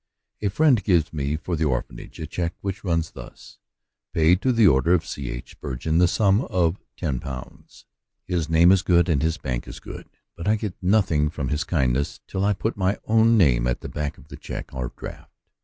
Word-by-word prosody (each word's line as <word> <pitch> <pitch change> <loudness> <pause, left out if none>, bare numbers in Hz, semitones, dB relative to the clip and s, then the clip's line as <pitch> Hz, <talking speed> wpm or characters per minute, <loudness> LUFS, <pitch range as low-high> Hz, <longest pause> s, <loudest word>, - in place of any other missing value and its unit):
A 105 - +1
friend 130 +1 +3
gives 85 -6 +2
me 70 -1 -1
for 85 +2 -3
the 80 0 0
Orphanage 65 -4 -4
a 80 - -4
check, 85 +1 -3
which 95 -1 -4
runs 85 -4 0
thus, - - -12 0.5
"Pay 80 +2 +5
to 130 +7 +1
the 115 -3 +4
order 80 +4 +4
of 85 - -1
C. 70 -3 -5
H. - - -7
Spur 70 -4 -6
geon, 80 +6 0
the 90 - +5
sum 100 +2 +3
of 90 -3 0 0.2
£\o'' 65 -5 -5 0.6
His 80 +1 -2
name 85 +2 +6
is 95 -2 +4
good, 85 -1 +3
and 80 -6 +1
his 80 +1 0
bank 60 -4 -4
is - - -8
good, - - -10 0.3
but 85 - -6
I 105 - +4
get 105 -3 -4
nothing 90 -6 +2
from 70 -4 -4
his 75 +1 0
kindness 70 -4 0
till 95 - -3
I 105 +1 +3
put 110 +4 -3
my 95 +1 +1
own 115 +1 +4
name 60 - +4
at 60 - -1
the - - -7
back 75 -1 -4
of 65 - -18
the - - -9
check - - -7
or 65 -2 -4
draft. - - -10
85 Hz, 210 wpm, -24 LUFS, 75-95 Hz, 0.6 s, name